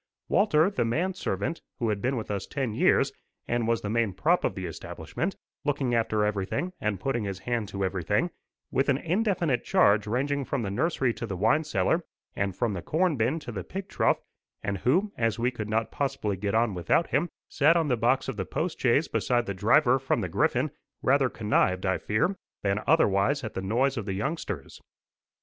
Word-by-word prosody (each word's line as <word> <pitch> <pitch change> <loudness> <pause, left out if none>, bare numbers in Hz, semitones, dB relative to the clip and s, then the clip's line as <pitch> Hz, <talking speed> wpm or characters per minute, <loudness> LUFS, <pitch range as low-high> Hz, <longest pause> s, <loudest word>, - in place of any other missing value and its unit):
Walter, 190 -3 +4
the 200 - 0
man 165 +12 0
servant, 170 -2 -3 0.2
who 115 -4 0
had 105 -2 -1
been 130 +1 0
with 110 - -4
us 100 -2 -3
ten 130 -6 -2
years, - - +3 0.4
and 120 -1 0
was 115 -1 +1
the 100 - -4
main 115 -3 +1
prop - - +2
of - - 0
the - - -4
establishment, - - -4 0.3
looking 140 -4 0
after 110 -2 +2
everything 105 - -2
and 105 -3 -1
putting 120 +1 -1
his 100 -1 -3
hand 115 +1 -2
to 100 -1 -2
everything, 100 - 0 0.4
with 135 +1 +1
an 135 - +4
indefinite 170 - 0
charge 105 +1 +4
ranging 140 +5 0
from 135 -2 -2
the 100 - -2
nursery 130 - +1
to 115 - -5
the 95 -3 -4
wine 115 - +3
cellar, 160 +2 +1 0.3
and 100 -2 -1
from 115 0 0
the 90 - -4
corn 165 - +1
bin 125 +6 +1
to 120 - -7
the 95 -5 -5
pig 195 - -6
trough, - - +2 0.4
and 100 -1 -2
who, 185 - +2
as 115 -2 +1
we 120 +2 +1
could 110 -4 -5
not 110 +1 0
possibly 115 -7 -1
get 100 +2 -2
on 115 -2 +2
without 90 - +2
him, 165 +6 +1 0.2
sat 155 +4 +4
on 165 -2 +1
the 125 - +2
box 120 +3 +1
of 135 -5 -4
the 95 - -1
post 170 - -3
chaise 130 +5 +3
beside 120 -1 +1
the 100 - -3
driver 120 +7 +4
from 135 -2 0
the 90 - -3
Griffin, - - +1 0.3
rather 135 0 +3
connived, 100 -4 +1
I 95 -1 +1
fear, 175 - 0 0.3
than 100 +1 +1
otherwise 140 -2 +3
at 110 - -5
the 95 - -3
noise 125 +8 +1
of 110 - -3
the 95 - -1
youngsters. 100 - -4
120 Hz, 205 wpm, -27 LUFS, 105-145 Hz, 0.4 s, Walter